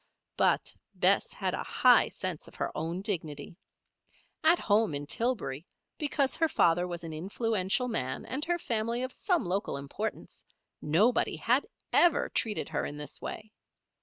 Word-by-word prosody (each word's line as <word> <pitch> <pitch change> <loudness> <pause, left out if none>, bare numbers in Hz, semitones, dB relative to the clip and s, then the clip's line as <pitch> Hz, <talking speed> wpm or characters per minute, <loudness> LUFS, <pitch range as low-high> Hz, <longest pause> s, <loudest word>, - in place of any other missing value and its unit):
But - - +2 0.2
Bess - - +3
had - - -2
a - - -2
high - - +5
sense - - -4
of - - -15
her - - -3
own 165 +5 -3
dignity. 160 -7 -3 0.9
At 325 +3 +6
home, 210 - +2
in 145 +1 -2
Tillbury, 175 - -1 0.3
because 285 -3 +1
her 325 -1 +2
father 175 - +3
was 175 -1 -6
an 165 -1 -6
influential 200 +6 0
man, 130 - -2
and 275 +3 -3
her 345 0 0
family 235 -4 -1
of 255 - -3
some 350 - 0
local 185 -4 -1
importance, 140 0 -6 0.4
nobody 195 +11 +2
had 250 - +1 0.3
ever 345 -3 +4
treated 220 -2 -1
her 155 - -1
in 145 - -5
this 150 0 -6
way. 215 0 -7
205 Hz, 155 wpm, -30 LUFS, 160-250 Hz, 0.9 s, At